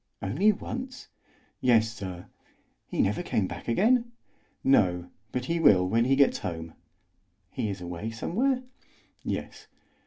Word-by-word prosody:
"Only 145 - +3
once?" 250 +5 -6 0.5
"Yes, 115 -3 +3
sir." 95 -4 -7 0.6
"He - - +1
never 105 +2 0
came 105 - 0
back - - -7
again?" 235 - +3 0.5
"No, 90 -9 +3 0.2
but 125 0 -2
he 170 +4 0
will 95 - +5
when 115 +4 +2
he 135 +2 +3
gets 140 0 +4
home." 80 -1 -5 0.8
"He 110 - -2
is 95 -2 -5
away 90 +5 -5
somewhere?" 250 - 0 0.6
"Yes." - - -5
115 Hz, 130 wpm, -28 LUFS, -, 0.8 s, will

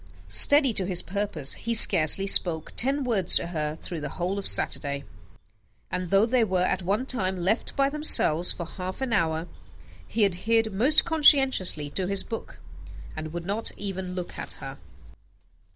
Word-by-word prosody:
Steady 285 -4 +6
to 190 -3 -2
his 180 -3 +1
purpose, 200 -7 -4
he 230 0 -3
scarcely 170 -2 +6
spoke 165 -5 +3
ten 275 +3 +2
words 205 -8 +1
to - - 0
her 155 -3 -5
through 165 0 -8
the 145 - -6
whole 185 +3 -3
of 200 - -5
Saturday: 140 -1 0 0.9
and 180 -1 -5
though 195 +3 +2
they 240 0 0
were 185 -4 -1
at 185 - -2
one 200 +8 -3
time 190 -8 -3
left 190 +7 -3
by 275 0 +1
themselves 275 - +2
for 170 - -7
half 185 +2 -8
an 260 -3 -3
hour, 165 -4 -2 0.6
he 220 -2 0
adhered 220 +4 -2
most 265 +10 +3
conscientiously 270 - +2
to 185 +2 -4
his 195 0 -2
book, 225 - -9 0.6
and 155 0 -8
would 170 0 -8
not 205 +4 -4
even 190 -2 -7
look 180 -1 -8
at - - -4
her. - - -11
190 Hz, 170 wpm, -24 LUFS, 175-230 Hz, 0.9 s, Steady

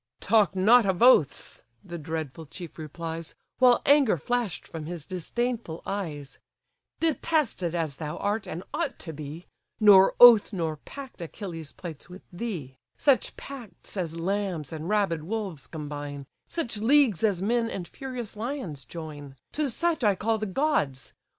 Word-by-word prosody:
"Talk 205 -5 +3
not 215 +4 +6
of 190 +3 +1
oaths 165 - +4 0.2
(the 170 -1 -7
dreadful 160 -1 -5
chief 170 +2 -9
replies, 165 +1 -5 0.2
While 250 -1 +5
anger 275 -10 +5
flash'd 240 - -2
from 155 -2 -7
his 170 -3 -6
disdainful 200 +1 -3
eyes), 155 -9 -5 0.6
Detested 300 - +1
as 160 -5 -2
thou 155 0 -5
art, 205 +1 -1
and 170 +3 -5
ought 320 -5 -2
to 160 - -7
be, 155 +3 -8 0.3
Nor 200 -3 +7
oath 235 -4 +9
nor 165 -4 -2
pact 270 - -10
Achilles 165 -3 -7
plights 160 -2 -9
with 185 +2 -11
thee: 175 - -5 0.2
Such 275 -5 +2
pacts 255 -8 -10
as 170 -4 -3
lambs 185 -4 -2
and 160 +2 -5
rabid 200 -7 +1
wolves 195 -5 -4
combine, 145 -2 -6 0.2
Such 245 -10 -3
leagues 235 - +4
as 195 -4 +2
men 230 +2 +1
and 180 -5 -5
furious 250 -3 -7
lions 215 - -4
join, 145 -2 -8 0.2
To 300 -2 -1
such 335 +3 0
I 205 -3 +4
call 220 +3 0
the 215 - -2
gods! 185 - 0
185 Hz, 150 wpm, -27 LUFS, 160-230 Hz, 0.6 s, oath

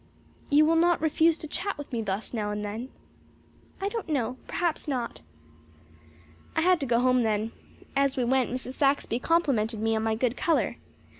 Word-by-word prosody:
"You 295 +1 +6
will 325 +1 +3
not 345 +1 +4
refuse 320 +1 +3
to 310 - -7
chat 360 +5 -2
with 290 -2 -9
me 230 - 0
thus 200 +2 -3
now 210 -3 -1
and 210 0 -3
then?" 225 +5 -5 0.9
"I 390 - -1
don't 415 -3 -4
know. 255 -4 -1
Perhaps 340 -2 -1
not." 250 -5 -3 1.3
I 320 - +2
had 360 +1 +4
to 275 - -3
go 235 0 +3
home 255 0 +4
then. 220 0 0 0.4
As 275 0 +2
we 255 - +2
went 255 +1 +2
Mrs. 255 +1 -3
Saxby 275 -4 +1
complimented 250 -10 +1
me 225 +1 +1
on 220 - 0
my 220 0 0
good 245 +1 0
colour. 330 +3 +1
260 Hz, 180 wpm, -27 LUFS, 225-315 Hz, 1.3 s, You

